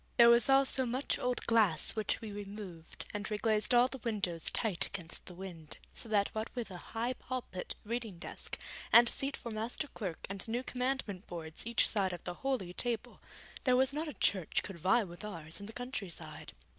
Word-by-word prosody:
There 235 0 +10
was 235 +2 +6
also 270 -1 +5
much 255 +4 0
old 250 0 0
glass 215 -9 +4
which 215 -1 0
we 220 -2 -5
removed, 200 -5 -7
and 205 +1 -3
reglazed 215 +2 +2
all 240 +1 +7
the 265 0 -6
windows 200 -8 -1
tight 205 -8 +1
against 170 -3 -6
the 180 - -9
wind, 175 -4 -7 0.2
so 230 - -2
that 205 -2 +3
what 220 +1 -3
with 235 -5 -3
a 180 - -6 0.2
high 240 +3 +1
pulpit, 250 -8 -5
reading 225 -4 -3
desk, - - -5 0.3
and 235 0 +10
seat 275 +3 -1
for 235 - -6
Master 225 +7 -2
Clerk 185 -7 -4
and 195 +1 -5
new 240 +3 -1
Commandment 250 -7 -2
boards 160 +3 -5
each 235 -1 +3
side 195 -4 +1
of 175 - -7
the 180 - -3
Holy 255 -10 -1
Table, 240 +3 -2 0.4
there 250 -1 +5
was 265 +1 +4
not 310 +2 -1
a 300 - -5
church 185 -5 +2
could 190 -3 -6
vie 190 +8 +4
with 175 0 -9
ours 165 -6 -4
in 200 - -7
the - - -7
countryside. 235 -7 -5
215 Hz, 195 wpm, -34 LUFS, 185-245 Hz, 0.4 s, There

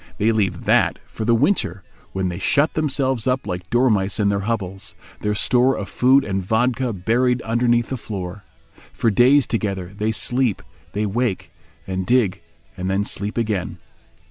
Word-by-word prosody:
They 110 +2 +2
leave 105 -4 -1
that - - +3
for 110 - -6
the 115 +1 +4
winter, 130 - 0 0.3
when 95 -1 -1
they 90 +1 -5
shut 145 - +2
themselves 135 -6 0
up 125 -2 0
like 90 -2 -5
dormice 110 -5 +2
in 100 -1 +3
their 100 0 +1
hovels, 95 -4 -4 0.2
their 105 0 -1
store 125 +4 +2
of 100 -3 -5
food 135 +2 +4
and 95 -1 -1
vodka 120 +5 0
buried 120 +6 +1
underneath 120 +1 +1
the 130 - -3
floor. 100 -3 -6 0.5
For 115 - +1
days 130 +6 +5
together 100 -4 -3
they 105 +2 -1
sleep, 120 -1 +1 0.3
then 105 -1 -2
wake 120 -4 -1 0.3
and 95 0 -3
dig, 120 -6 +2 0.4
then 95 +2 0
sleep 100 +1 -3
again. 105 -6 -2
110 Hz, 160 wpm, -21 LUFS, 95-125 Hz, 0.5 s, days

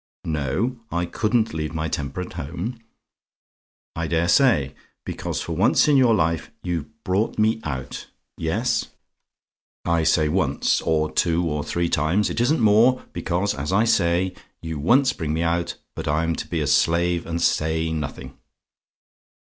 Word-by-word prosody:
"No; 80 - -1
I 85 0 0
COULDN'T 110 +4 0
leave 80 0 -4
my 80 0 -1
temper 75 +1 -3
at 90 - -7
home. 90 - -5 1.2
I 85 0 -2
dare 85 +1 +1
say! 85 - +3 0.3
Because - - -4
for 85 - -4
once 95 - +4
in 150 - +4
your 125 -4 +5
life 85 -3 0
you've 85 -4 -2 0.2
brought 100 +4 0
me 110 +1 +2
out 65 -3 -5 0.3
yes, 110 +10 -1 1.0
I 85 -1 +2
say 80 -1 +3
once, 75 -4 +1
or 80 -1 0
two 85 0 +1
or 75 -2 -2
three 85 +4 -1
times, 85 +7 +1
it - - -1
isn't 140 +3 +2
more; 115 +4 +4
because, 95 +4 -1
as 70 +4 -4
I 100 +4 +3
say, 90 -4 +2 0.3
you 80 -2 -5
once 125 - +3
bring 80 -3 -3
me 80 - 0
out, 85 +1 -1 0.2
I'm 80 +2 0
to - - -5
be 85 -2 -2
a - - 0
slave 85 +4 +2
and 85 0 -2
say 80 0 +1
nothing. 75 -3 -5
85 Hz, 155 wpm, -23 LUFS, 80-105 Hz, 1.2 s, your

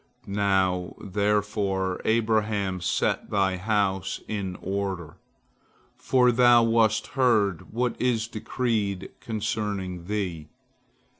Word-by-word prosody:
Now, 95 -3 0
therefore, 100 -2 -1
Abraham, 110 -4 +1
set 85 -1 0
thy 95 -2 +1
house 95 -2 0
in 100 -4 -3
order, 95 -4 -4 0.8
for 125 -1 +3
thou 120 0 +6
wast 115 -1 +3
heard 110 - +1
what 120 +2 -1
is 115 -3 +1
decreed 110 -4 -2
concerning 105 -5 -3
thee." 90 -6 -3
105 Hz, 90 wpm, -26 LUFS, 95-110 Hz, 0.8 s, thou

